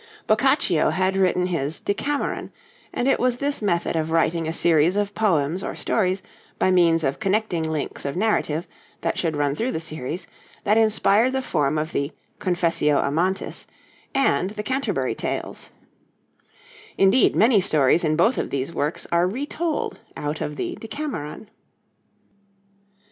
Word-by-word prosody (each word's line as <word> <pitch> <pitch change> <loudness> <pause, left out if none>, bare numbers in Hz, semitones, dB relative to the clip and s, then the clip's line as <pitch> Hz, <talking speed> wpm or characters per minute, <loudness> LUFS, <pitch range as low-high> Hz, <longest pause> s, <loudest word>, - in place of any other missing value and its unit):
Boccaccio 220 - +3
had 190 +1 +1
written 180 -1 +2
his 160 -4 -2
'Decameron,' 280 +8 -2 0.4
and 245 - -1
it 270 - +3
was 250 -1 +1
this 285 0 -1
method 175 -5 0
of 160 0 -1
writing 165 0 +1
a - - -1
series 165 +1 +3
of 205 0 -1
poems 175 -5 +1
or - - -4
stories 190 -3 0 0.3
by 185 - +2
means 165 -3 +4
of 135 -1 -1
connecting 195 -6 0
links 155 -2 -4
of 140 +2 -3
narrative 175 -5 0 0.3
that - - -1
should 160 -3 -1
run 145 -1 +1
through 230 - -1
the - - -2
series, 155 +1 -4 0.4
that 210 - +3
inspired 220 +2 +3
the 265 - 0
form 150 - 0
of 155 +2 -2
the 140 +2 -1 0.3
'Confessio 165 -5 +1
Amantis' 175 +7 -1 0.5
and 185 - +2
the 210 0 -5
'Canterbury 265 +4 -1
Tales'; - - -4 1.3
indeed, 195 +6 +4
many 220 -2 +5
stories 155 -3 +3
in 155 -1 +2
both 220 +10 +3
of - - -2
these 140 +4 -3
works 150 +3 -2
are 170 +1 +3
retold 290 - -3 0.2
out 150 +1 -3
of 150 - -3
the - - -4
'Decameron.' 225 - -6
180 Hz, 150 wpm, -23 LUFS, 155-215 Hz, 1.3 s, many